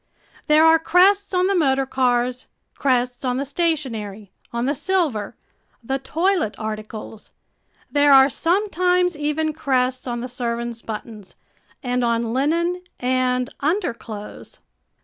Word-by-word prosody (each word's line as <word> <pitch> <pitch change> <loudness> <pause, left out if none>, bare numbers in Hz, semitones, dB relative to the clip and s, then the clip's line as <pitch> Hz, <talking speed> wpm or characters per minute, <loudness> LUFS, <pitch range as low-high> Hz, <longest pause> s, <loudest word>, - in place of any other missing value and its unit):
There 305 +1 +5
are 325 0 +6
crests 390 +5 +3
on 365 -1 +2
the 395 - +2
motor 270 -6 +2
cars, 250 -1 0 0.3
crests 250 -2 0
on 250 -1 0
the 275 - -2
stationery, 245 - -3 0.2
on 235 +1 -2
the 280 - +1
silver, 305 - -1 0.5
the 270 +4 -2
toilet 330 - 0
articles 215 0 -7 0.6
there 290 0 +4
are 270 -1 +8
sometimes 360 - +1
even 300 +1 -1
crests 260 -4 0
on 240 -1 -3
the 250 - -4
servants' 235 -2 -4
buttons 215 -2 -8 0.5
and 250 -1 0
on 230 -1 0
linen 335 +7 0 0.2
and 255 0 0
underclothes! 235 - -4
265 Hz, 125 wpm, -22 LUFS, 235-320 Hz, 0.6 s, are